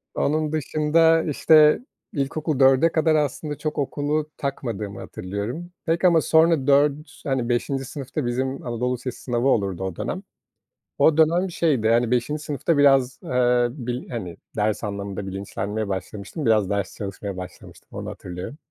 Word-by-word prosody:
Onun 155 +1 0
dışında, 155 +2 +3
işte, 155 0 +5 0.3
ilkokul 150 +1 -2
4'e 135 +4 +5
kadar 160 -1 +2
aslında 150 0 -1
çok 155 -1 -4
okulu 145 +2 -1
takmadığımı 110 -8 -4
hatırlıyorum 105 - -5
pek 165 +2 0
ama 170 -3 +5
sonra 160 -4 +3
4, 145 +2 +2
hani 130 -5 -1
5'inci 135 +3 -1
sınıfta 140 +1 -5
bizim 130 +3 -2
anadolu 120 +1 -1
lisesi 125 0 -6
sınavı 120 0 0
olurdu 100 -7 +1
o 95 -2 -3
dönem. - - -4 0.7
O 160 -1 +4
dönem 170 +4 +3
şeydi, 140 -10 +1
hani, 115 +1 +3
5'inci 125 +5 0
sınıfta 150 +1 0
biraz, 135 -3 +4
ııı, 125 -1 +2
bil 125 -1 -5
hani, 95 -9 -5 0.2
ders 105 +1 0
anlamında 100 -1 -4
bilinçlenmeye 100 +2 -4
başlamıştım. 100 - -5
Biraz 110 -4 +3
ders 100 -1 -2
çalışmaya 100 -1 -5
başlamıştım, 90 -1 -10
onu - - -6
hatırlıyorum. 90 +10 -7
130 Hz, 145 wpm, -23 LUFS, 110-150 Hz, 0.7 s, işte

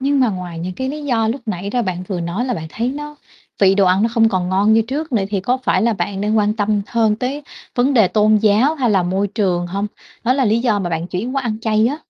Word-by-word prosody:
Nhưng 280 +1 +1
mà 250 - +4
ngoài 180 -4 -5
những 180 +3 -4
cái 260 0 -3
lý 295 +2 -5
do 225 -5 +1
lúc 260 +5 -2
nãy 200 -1 -3
ra 245 +2 0
bạn 185 -3 -3
vừa 185 -4 -2
nói 170 +8 -2
là 250 -1 -1
bạn 160 -5 -5
thấy 230 +8 -2
nó 295 +2 -6 0.4
vị 195 -1 +5
đồ 200 - +3
ăn 185 +2 +3
nó 225 - +3
không 225 -1 +4
còn 185 -3 -1
ngon 195 +3 +3
như 225 +1 +4
trước 280 +7 -4
nữa 210 -5 +1
thì 200 -2 0
có 245 +7 0
phải 260 - +1
là 230 0 +2
bạn 195 0 -3
đang 210 +2 0
quan 210 0 +1
tâm 210 -1 0
hơn 220 -3 +1
tới 265 +5 -3 0.3
vấn 260 +3 +2
đề 220 -7 +5
tôn 215 +1 +3
giáo, 220 +8 +3
hay 255 -6 0
là 195 -3 +3
môi 190 +3 0
trường 185 -4 0
hông? 200 +4 -2 0.4
Đó 250 - +3
là 265 0 +1
lý 220 0 +2
do 225 -5 +1
mà 175 -3 -3
bạn 165 +1 -2
chuyển 225 +10 -4
qua 270 - 0
ăn 220 -2 -3
chay 220 0 +2
á. 285 +5 -2
215 Hz, 285 wpm, -18 LUFS, 190-250 Hz, 0.4 s, vị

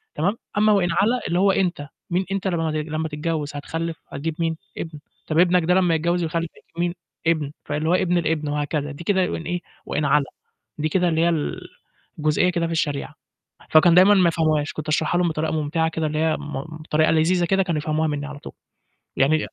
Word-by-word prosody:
تمام؟ 195 +9 0 0.2
أما 215 0 +5
وإن 185 -3 +3
علا 210 +8 +2
اللي 175 +1 +1
هو 195 0 +5
أنت، 175 -7 -1 0.2
مين 180 +2 0
أنت 195 0 -1
لما 165 -3 0
لما 155 +1 -2
تتجوّز، 150 -1 -3
هتخلّف، 160 +3 -4
هتجيب 155 +3 -4
مين؟ 165 -1 0 0.2
ابن، 160 -3 -6 0.3
طَب 155 +1 +1
ابنك 180 -1 +4
ده 180 +2 +3
لما 180 -3 +3
يتجوّز 170 +2 0
ويخلّف 165 0 -2
هيجيب 170 - -16
مين؟ 175 0 +1 0.3
ابن، 155 -4 +1
فاللي 150 +2 -1
هو - - +4
ابن 180 -1 +2
الابن 155 -3 0
وهكذا. 145 0 -2
دي 145 +4 -9
كده 190 -1 +1
وإن 165 - -4
إيه؟ 175 0 -2 0.2
وإن 150 0 -1
علا، 140 -1 +2 0.5
دي 155 +1 -1
كده 180 +1 +2
اللي 160 0 +1
هي 170 - +4
ال 160 -3 -2 0.6
الجزئية 155 +4 +2
كده 170 -1 0
في - - -5
الشريعة. 145 -3 -2 0.6
فكانوا 165 +2 +6
دايمًا 190 +3 +7
ما 185 -3 +5
يفهموهاش، 155 -2 0
كنت 155 0 -6
أشرحها 155 +3 +1
لهم 175 -1 +2
بطريقة 155 0 -2
مُمْتِعَة 160 +1 0
كده 160 -1 -2
اللي 155 0 -3
هي 160 0 +2
م 145 -2 -5 0.2
بطريقة 155 0 +2
لذيذة 170 +2 +3
كده 195 +2 +2
كانوا 170 -4 -1
يفهموها 155 +1 0
مني 145 -1 -2
على 145 0 -8
طول. - - -10 0.6
يعني 150 +3 +3
160 Hz, 205 wpm, -23 LUFS, 155-175 Hz, 0.6 s, دايمًا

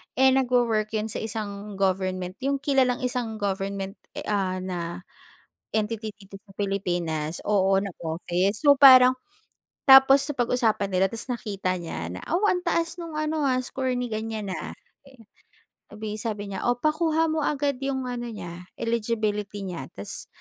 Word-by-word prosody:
Eh, 265 0 +5
nagwo-work 240 -5 +2
yun 215 +1 -1
sa - - -4
isang 210 -2 -5
government, 185 -1 -1
yung 280 0 +1
kilalang 265 -3 +2
isang 245 -3 -2
government, 195 0 -3 0.2
e - - -5
ah, 190 -3 0
na 175 -1 -4 0.7
entity 220 0 -1
dito 195 -1 -13
sa 195 - -17
Pilipinas, 175 -6 -2
oo, 195 -2 +3
na 200 - -3 0.2
office. 175 +5 -1
So, 285 -1 +7
parang 255 -2 +9 0.7
tapos 270 +1 +8
napag-usapan 240 -6 +1
nila. 185 +1 +4
Tapos 230 +3 -6
nakita 200 -6 -2
niya 85 - -5
na, 90 - -6
wow, 365 +6 +2
"Ang 360 - -2
taas 335 0 0
no'ng 330 -2 -7
ano 310 0 -1
ha, 255 - +2
score 260 -2 -2
ni 245 0 -2
ganyan, 215 -2 -4
ah." - - -6 0.4
Eh, 250 -4 -18 0.7
sabay 215 0 -5
sabi 210 -2 -3
niya, - - -4
oo, 245 - +3
"Pakuha 320 +1 +2
mo 310 -2 0
agad 285 -2 0
yong 265 -2 -2
ano 240 -1 -4
niya, 180 -3 -8
eligibility 215 -3 -1
niya. 165 -7 -6
Tas, 100 +1 -7
215 Hz, 155 wpm, -25 LUFS, 195-260 Hz, 0.7 s, parang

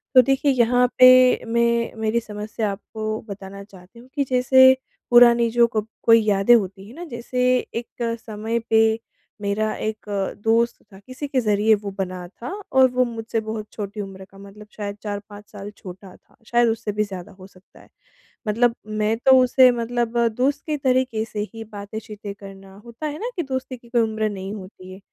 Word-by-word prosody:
तो 255 - +10
देखिए, 270 +3 +1
यहाँ 250 0 +3
पे 255 0 +7
मैं 235 0 +1
मेरी 220 +1 +1
समस्या 210 -1 -4
आपको 215 +2 -5
बताना 200 0 -8
चाहती 195 +2 -17
हूँ 245 - -16
कि 285 - +1
जैसे, 260 +1 +6 0.4
पुरानी 240 -1 +6
जो 235 0 +4
कब 215 0 -1 0.2
कोई 230 -1 +6
यादें 200 +4 +5
होती 195 -2 -2
हैं 230 - -13
ना 345 - -8
जैसे 250 -2 -3 0.3
एक 235 +1 -4 0.3
समय 220 +1 -3
पे 220 0 +3 0.4
मेरा 210 +2 -1
एक 215 0 -5 0.4
दोस्त 230 +1 +2 0.2
था, 190 - -13
किसी 255 +7 -8
के 270 -2 0
ज़रिए 215 0 +3
वो 205 -1 -6
बना 180 -2 -4
था 235 +6 -9 0.2
और 260 -1 +5
वो 250 0 +2
मुझसे 230 -1 -4
बहुत 220 -1 -6
छोटी 205 0 -5
उम्र 190 -1 -9
का 195 - -18
मतलब 200 +2 -13
शायद 205 -1 -5
4-5 205 0 -7
साल 205 0 -8
छोटा 190 -1 -11
था, - - -27
शायद 240 -1 +3
उससे 225 -1 -2
भी 210 +1 0
ज़्यादा 195 -1 -8
हो 185 - -11
सकता 185 -1 -22
है। - - -21 0.6
मतलब 230 +2 +2
मैं 215 +1 0
तो 265 - +7
उसे 255 0 +6
मतलब 240 0 -2 0.2
दोस्त 280 +3 +1
के 305 - 0
तरीके 255 -4 0
से 215 -1 -7
ही 225 0 -7
बातें-चीतें 205 0 -8
करना, 195 -1 -13
होता 235 +6 -8
है 295 0 -5
ना 465 +5 -3
कि 345 - -2
दोस्ती 260 -2 -5
की 235 0 -20
कोई 240 -1 +2
उम्र 220 -1 -1
नहीं 195 -1 -6
होती 185 -2 -11
है। 190 - -12
220 Hz, 185 wpm, -22 LUFS, 205-240 Hz, 0.6 s, तो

